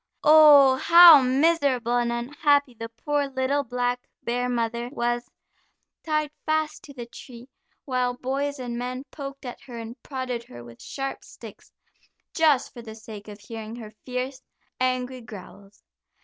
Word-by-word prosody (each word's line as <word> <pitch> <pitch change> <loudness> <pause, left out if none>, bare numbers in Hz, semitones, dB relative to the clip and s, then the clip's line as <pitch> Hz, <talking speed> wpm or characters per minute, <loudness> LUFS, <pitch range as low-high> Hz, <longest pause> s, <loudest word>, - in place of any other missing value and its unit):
Oh, 295 -4 +7
how 335 0 +9
miserable 260 -3 +1
and 240 -1 +1
unhappy 285 +3 +1
the 230 0 -8
poor, 285 +5 -2
little 275 +1 -1
black 245 0 -3 0.2
bear 245 +1 -1
mother 235 0 -2
was, 240 -1 -2 0.7
tied 305 -2 -1
fast 310 0 -1
to 285 - -12
the 240 -2 -7
tree, 240 +1 -13 0.4
while 250 -2 -1
boys 280 +3 -3
and 240 -2 -5
men 250 +1 -5
poked 275 -2 -8
at 245 - -8
her 255 -4 -10
and 230 +2 -9
prodded 255 -3 -5
her 120 0 -12
with 120 -1 -14
sharp 270 -1 -6
sticks, - - -14 0.6
just 300 -5 +2
for 240 - -10
the 220 -1 -10
sake 220 -2 -11
of 205 0 -10
hearing 225 0 -8
her 220 -3 -10
fierce, 255 +1 -5 0.4
angry 255 0 -1
growls. 200 -2 -13
250 Hz, 150 wpm, -25 LUFS, 235-280 Hz, 0.7 s, how